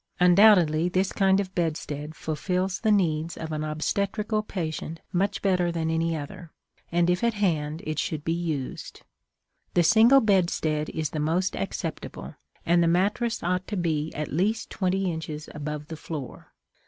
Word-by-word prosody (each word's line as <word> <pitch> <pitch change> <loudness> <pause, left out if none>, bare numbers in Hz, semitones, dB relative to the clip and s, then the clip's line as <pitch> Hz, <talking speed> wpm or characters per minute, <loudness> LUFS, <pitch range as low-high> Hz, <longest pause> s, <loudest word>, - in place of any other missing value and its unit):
Undoubtedly, 180 -3 +5
this 185 +1 0
kind 195 -1 +3
of 190 -2 -3
bedstead 155 -3 -3
fulfills 180 +5 -2
the 220 -1 +2
needs 165 -5 +1
of 160 -1 -5
an 155 0 -2
obstetrical 200 +7 -1
patient 165 -5 -5
much 190 +3 0
better 180 -3 +2
than 160 -1 -1
any 165 0 0
other; 165 +4 -8 0.4
and, 170 0 +2
if 180 +3 +1
at 235 -1 +2
hand, 160 -6 -1
it 155 -1 -2
should 155 -2 -2
be 165 - +1
used. 160 -6 -4 0.7
The 175 - +5
single 230 +8 +6
bedstead 170 - +1
is 155 -2 -3
the 155 - -3
most 165 +5 0
acceptable, 100 - -5 0.3
and 170 +1 +4
the 170 - +3
mattress 205 +7 +1
ought 180 +1 -1
to 205 - -3
be 160 -3 -1
at 150 -2 -4
least 210 +7 0
twenty 190 -1 0
inches 160 -2 -6
above 150 0 -5
the 160 - -7
floor. 150 -6 -7
170 Hz, 160 wpm, -26 LUFS, 155-190 Hz, 0.7 s, single